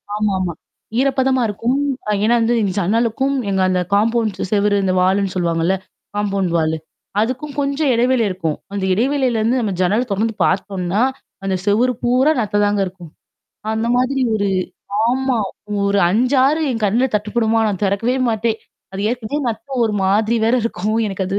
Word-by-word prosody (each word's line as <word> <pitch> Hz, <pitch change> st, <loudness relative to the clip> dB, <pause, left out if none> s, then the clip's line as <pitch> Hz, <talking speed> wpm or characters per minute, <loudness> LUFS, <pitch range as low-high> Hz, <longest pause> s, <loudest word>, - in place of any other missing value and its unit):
ஆமாமா. 190 Hz, -5 st, 0 dB, 0.5 s
ஈரப்பதமா 265 Hz, -1 st, +2 dB
இருக்கும். 230 Hz, +5 st, -1 dB, 0.5 s
ஏன்னா 230 Hz, +3 st, +4 dB
வந்து 230 Hz, +1 st, +2 dB
இந்த 200 Hz, -3 st, 0 dB
ஜன்னலுக்கும், 230 Hz, +8 st, +1 dB
எங்க 190 Hz, -1 st, +1 dB
அந்த 185 Hz, -1 st, +1 dB
காம்பவுண்ட் 220 Hz, 0 st, +1 dB
செவுரு 205 Hz, -1 st, +2 dB
இந்த 185 Hz, -1 st, +1 dB
வாலுன்னு 190 Hz, +1 st, +1 dB
சொல்லுவாங்கல்ல, 170 Hz, 0 st, +1 dB, 0.4 s
காம்பவுண்ட் 200 Hz, -3 st, 0 dB
வாலு. 160 Hz, 0 st, 0 dB, 0.4 s
அதுக்கும் 260 Hz, +5 st, -3 dB
கொஞ்சம் 280 Hz, +1 st, 0 dB
இடைவெளி 245 Hz, +1 st, +2 dB
இருக்கும். 165 Hz, -5 st, -2 dB, 0.2 s
அந்த 200 Hz, -1 st, -2 dB
இடைவெளியிலேருந்து 250 Hz, 0 st, +1 dB
நம்ம 210 Hz, -4 st, -1 dB
ஜன்னல் 210 Hz, +7 st, +1 dB
தொறந்து 220 Hz, +3 st, 0 dB
பார்த்தோம்னா, 190 Hz, +2 st, -1 dB, 0.4 s
அந்த 195 Hz, -1 st, 0 dB
செவுரு 230 Hz, +5 st, +2 dB
பூரா 255 Hz, +5 st, +3 dB
நத்தைதாங்க 205 Hz, -1 st, +1 dB
இருக்கும். 180 Hz, -3 st, -10 dB, 0.6 s
அந்த 220 Hz, +1 st, -1 dB
மாதிரி 260 Hz, +2 st, +1 dB
ஒரு, 205 Hz, -1 st, 0 dB, 0.6 s
ஆமா 260 Hz, +1 st, +1 dB, 0.5 s
ஒரு 200 Hz, 0 st, +2 dB
5,6 260 Hz, -, +3 dB
என் 225 Hz, -3 st, -3 dB
கண்ணுல 230 Hz, +6 st, +2 dB
தட்டுப்படுமா, 220 Hz, +2 st, +1 dB
நான் 200 Hz, -1 st, -3 dB
திறக்கவே 200 Hz, +6 st, +1 dB
மாட்டேன். 220 Hz, 0 st, -1 dB, 0.3 s
அது 195 Hz, -, -5 dB
ஏற்கனவே 245 Hz, +3 st, -3 dB
நத்த 230 Hz, +4 st, -5 dB, 0.2 s
ஒரு 220 Hz, -, 0 dB
மாதிரி 215 Hz, +4 st, +2 dB
வேற 230 Hz, -, +3 dB
இருக்கும். 215 Hz, -1 st, -1 dB
எனக்கு 195 Hz, -1 st, -3 dB
அது 195 Hz, +1 st, -1 dB
215 Hz, 145 wpm, -19 LUFS, 195-245 Hz, 0.6 s, ஏன்னா